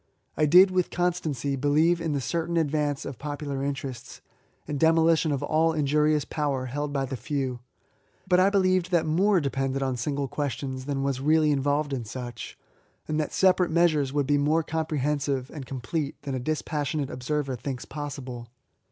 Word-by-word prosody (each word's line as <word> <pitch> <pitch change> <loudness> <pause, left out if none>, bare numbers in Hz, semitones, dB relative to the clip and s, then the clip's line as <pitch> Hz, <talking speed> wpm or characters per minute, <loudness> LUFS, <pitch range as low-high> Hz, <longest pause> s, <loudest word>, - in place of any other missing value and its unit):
I 155 - +2
did 185 +5 +7
with 185 -1 +1
constancy 165 -6 -1
believe 155 +5 +2
in 160 -2 -1
the 140 - -1
certain 170 +4 -1
advance 150 -2 0
of 130 - -7
popular 145 -1 -4
interests, 135 -3 -5 0.5
anddenio 160 +3 +3
Ution 160 -1 +2
of 140 0 -1
all 160 +2 +2
injurious 150 0 +2
power 140 -4 -2
held 145 +3 -3
by 135 -1 -1
the 135 - -5
few; 135 -3 -3 0.7
but 180 -1 +4
I 190 +2 +5
believed 185 -3 +2
that 175 -3 +2
more 185 +5 +3
depended 135 -2 -1
on 130 -2 -1
single 140 +3 -2
questions 135 -2 -4
than 140 -1 -2
was 135 -2 -1
really 155 +1 +3
involved 145 +1 0
in 125 -3 -2
such, 120 0 -7 0.5
and 155 0 -1
that 155 - -1
sepa 190 -1 +3
rate 180 - +2
measures 160 -5 +3
would 145 0 0
be 145 +1 +2
more 155 +3 +2
comprehensive 150 -4 -1
and 140 -5 -8
complete 140 +4 -3
than 140 - -4
a 130 - -1
dispassionate 150 0 -2
observer 135 +1 -2
thinks 125 -1 -5
pos 145 +1 -6
sible. 125 -3 -7
145 Hz, 175 wpm, -26 LUFS, 135-160 Hz, 0.7 s, did